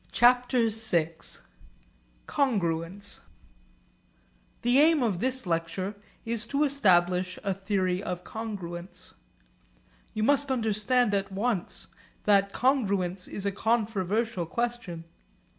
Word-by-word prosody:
CHAPTER 245 0 +4
VI 180 -7 +1 1.1
CONGRUENCE 195 - -1 1.4
The 245 +3 +4
aim 310 -2 +5
of 205 -7 0
this 260 +2 0
lecture 170 +3 -2 0.3
is 230 0 -2
to 280 +4 +1
establish 185 -9 +3
a 200 -2 0
theory 190 -1 -1
of 180 -3 -4
congruence. 185 -5 -6 1.0
You 215 - 0
must 285 +3 +3
understand 230 -1 +2
at 200 0 0
once 200 -1 -1 0.4
that 200 -1 +4
congruence 195 -9 +1
is 200 - -4
a 200 - +1
controversial 215 -2 0
question. 235 -6 -3
205 Hz, 100 wpm, -28 LUFS, 185-240 Hz, 1.4 s, aim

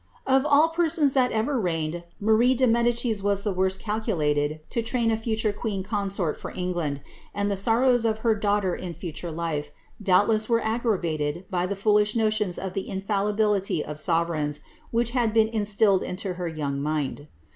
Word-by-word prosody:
Of 265 +2 +3
all 300 +2 +5
persons 325 -4 +2
that 255 -2 +3
ever 240 +5 0
reigned, 170 -2 -2
Marie 220 +4 +3
de 260 +1 +3
Medicis 235 -2 +1
was 200 0 +1
the 205 - -1
worst 190 +1 0
cal 215 0 -2
rulated 150 -5 0
to 235 - 0
train 230 0 0
a - - +2
future 220 -1 -1
queen 205 -2 -3
consort 195 -5 -1
for - - -6
England, 175 -6 -3 0.3
and 205 0 0
the - - 0
sorrows 235 +4 +3
of 220 -1 +1
her 225 - +5
daughter 205 -3 0
in 175 -2 -6
future 170 0 -6
life, 160 -2 -3 0.3
doubtless 205 +3 +3
were 230 -1 +3
aggravated 180 -9 -1
by 180 -1 0
the 200 - -3
foolish 210 +1 +2
notions 215 -4 0
of 190 -1 -5
the 195 - -4
infallibility 200 -2 0
of 150 0 -4
sovereigns 160 -2 0 0.3
which 235 0 0
had 235 -3 0
been 220 -1 +4
instilled 205 -3 +2
into 185 +1 -4
her 180 -1 -4
young 145 -4 -3
mind. 150 -1 -2
205 Hz, 175 wpm, -25 LUFS, 175-225 Hz, 0.3 s, all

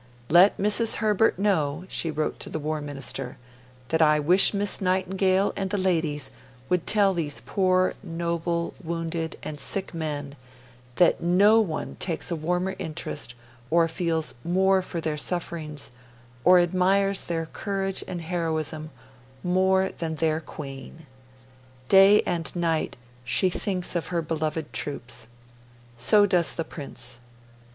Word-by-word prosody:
'Let 175 +5 +6
Mrs. 210 +3 +1
Herbert 215 -1 +2
know,' 175 -5 0
she 165 - -1
wrote 155 0 -2
to - - -6
the - - -3
War 155 0 -3
Minister, 135 -3 -3 0.5
'that 160 0 +1
I 150 -1 +5
wish 175 +6 +6
Miss 205 0 -1
Nightingale 190 +1 +1
and 195 -1 -2
the 205 - -1
ladies 165 -6 0 0.4
would 180 -2 0
tell 200 -2 +4
these 155 -5 -2
poor 185 - +1
noble, 170 -1 -2
wounded, 165 -1 -3
and 150 -1 -5
sick 195 +4 0
men 145 -3 -4 0.6
that 175 +3 +4
NO 200 +6 +5
ONE 165 -8 -4
takes 175 -1 -2
a - - 0
warmer 180 +4 -1
interest 150 -5 -4 0.3
or 165 0 +4
feels 165 -1 -1
MORE 190 +2 +3
for 175 -2 -5
their 155 -2 -2
sufferings 155 -3 -3 0.5
or 180 0 +7
admires 190 +3 +2
their 165 -1 -2
courage 195 +2 -3
and 175 -2 -5
heroism 160 -2 -2 0.5
MORE 190 +1 +2
than 160 -1 -4
their 160 0 +1
Queen. 145 0 -9 0.8
Day 195 +2 +7
and 170 -1 -2
night 165 -2 0 0.3
she 185 +8 +2
thinks 185 -1 -2
of 170 - -1
her 170 -2 -1
beloved 155 -1 -3
troops. 120 -5 -4 0.7
So 205 - +5
does 180 -4 +2
the 165 - -3
Prince. 130 -6 -7
170 Hz, 135 wpm, -25 LUFS, 155-190 Hz, 0.8 s, or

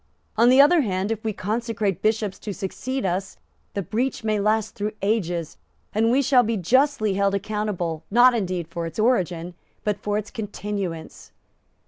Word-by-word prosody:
On 230 +2 +5
the 260 +2 +6
other 300 +4 +7
hand, 195 -3 -1
if 220 -1 -3
we 220 - 0
consecrate 215 -2 -2
Bishops 215 -2 0
to 205 -3 -5
succeed 255 +6 -3
us, 190 +1 -2 0.4
the 200 - -1
breach 235 +8 -2
may 215 -1 +1
last 215 +1 +1
through 210 +1 -3
ages, 175 -6 -1 0.4
and 225 +2 +2
we 265 +4 +3
shall 260 -1 +5
be 230 -1 -1
justly 225 - +2
held 200 0 +1
accountable, 200 -5 -2
not 245 +4 +6
indeed 185 -7 -2
for 170 0 -4
its 165 - -9
origin, 180 -7 +1 0.3
but 210 -2 -1
for 205 0 -1
its 210 0 -5
continuance." 200 -7 -5
210 Hz, 165 wpm, -24 LUFS, 190-230 Hz, 0.4 s, other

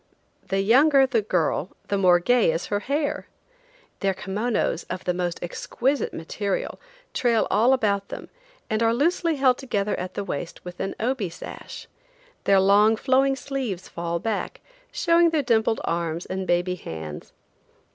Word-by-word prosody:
The 195 0 +1
younger 270 +6 +5
the 240 -4 +1
girl 180 -3 -1
the 200 - +1
more 180 -2 +6
gay 240 0 +3
is 165 +2 -2
her 205 - +2
hair. 285 +6 -2 0.7
Their 195 -1 0
kimonos, 210 -2 -1
of 185 - -4
the 180 - 0
most 175 -1 -2
exquisite 260 +10 -1
material, 195 +4 -3 0.3
trail 235 -3 +2
all 235 +6 +5
around 200 -4 +1
them, - - -8 0.4
and 220 -1 -1
are 230 0 +3
loosely 330 +4 +1
held 260 -3 +3
together 210 -6 -1
at 185 0 -5
the 200 - -2
waist 175 -2 -6
with 180 0 -8
an 195 - -3
obi 230 -4 -1
sash; 170 - -9 0.6
their 195 -1 +5
long 205 +3 +5
flowing 270 +3 +2
sleeves 260 -9 -4
fall 170 0 -3
back, 215 +4 -3 0.3
showing 340 -1 +4
their 315 -3 +1
dimpled 225 -2 +2
arms 170 0 -2
and 190 0 -4
baby 175 +1 +1
hands. 80 - -7
205 Hz, 155 wpm, -24 LUFS, 180-255 Hz, 0.7 s, more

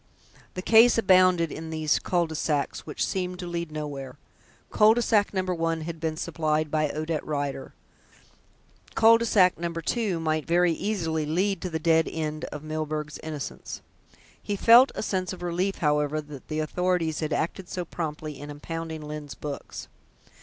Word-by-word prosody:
The 185 - -4
case 230 +3 +6
abounded 185 -5 +4
in 160 +1 -6
these 155 -1 +1
culs 175 -2 0
de - - -5
sac 150 -2 -1
which 150 - -2
seemed 180 -1 -3
to 180 - -6
lead 170 -2 -4
nowhere. 145 -4 -6 0.5
Cul 215 +1 +5
de 240 - +1
sac 210 -3 +2
No. 190 -2 -1
1 165 -3 -1
had 165 +1 -6
been 160 -1 -2
supplied 155 -2 -1
by 155 -1 +1
Odette 155 +1 -3
Rider; 140 -2 -4 1.2
cul 230 +1 +6
de 235 - -1
sac 185 -6 +4
No. 170 0 -2
2 175 +3 -1
might 155 -1 -1
very 175 +1 +3
easily 165 -5 -1
lead 185 +4 0
to 185 - -3
the 160 - -2
dead 160 0 +3
end 155 0 -3
of 150 0 -8
Milburgh's 155 -1 -4
innocence. 155 -3 -6 0.6
He 205 - -3
felt 235 +6 +7
a - - -3
sense 185 -3 -2
of 180 - -9
relief, 180 +3 -1
however, 150 0 +1
that 150 -3 -10
the 155 0 -2
authorities 170 -1 0
had 155 -1 -2
acted 175 +4 -2
so 180 -1 -4
promptly 155 -3 -5
in 145 +1 -8
impounding 160 +1 -6
Lyne's 150 -2 -7
books. 145 -2 -7
160 Hz, 170 wpm, -26 LUFS, 155-180 Hz, 1.2 s, felt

